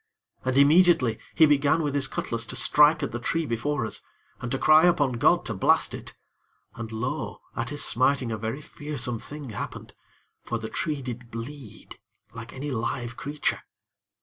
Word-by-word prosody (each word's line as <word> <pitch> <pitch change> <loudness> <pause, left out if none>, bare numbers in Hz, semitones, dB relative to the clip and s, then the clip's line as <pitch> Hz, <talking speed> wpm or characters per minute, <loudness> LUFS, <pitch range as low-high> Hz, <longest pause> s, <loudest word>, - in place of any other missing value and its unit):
And, 130 +1 0
immediately, 145 -5 +5 0.2
he 160 - +7
began 145 +2 +3
with 145 -2 -1
his 140 -2 +3
cutlass 115 0 -3
to - - -5
strike 150 +1 +4
at 140 - -2
the 120 - -4
tree 165 +6 -1
before 120 +1 -1
us, 110 - -7 0.4
and 125 - -5
to 135 - +1
cry 155 +4 +6
upon 150 -7 +3
God 175 +7 +4
to 115 - -2
blast 95 - +2
it; - - -7 0.6
and 115 -1 -7
lo! 110 0 -4 0.2
at 120 +1 -2
his 145 - 0
smiting 130 0 +1
a 110 - -2
very 115 +6 -4
fearsome 135 -6 -4
thing 145 -2 -8
happened, 105 - -7 0.5
for 120 - -3
the 110 -1 -6
tree 150 -4 -2
did 125 -1 -7
bleed 120 +1 -9 0.3
like 115 +1 -8
any 145 +2 -5
live 120 0 -3
creature. 145 +3 -2
130 Hz, 175 wpm, -26 LUFS, 115-150 Hz, 0.6 s, he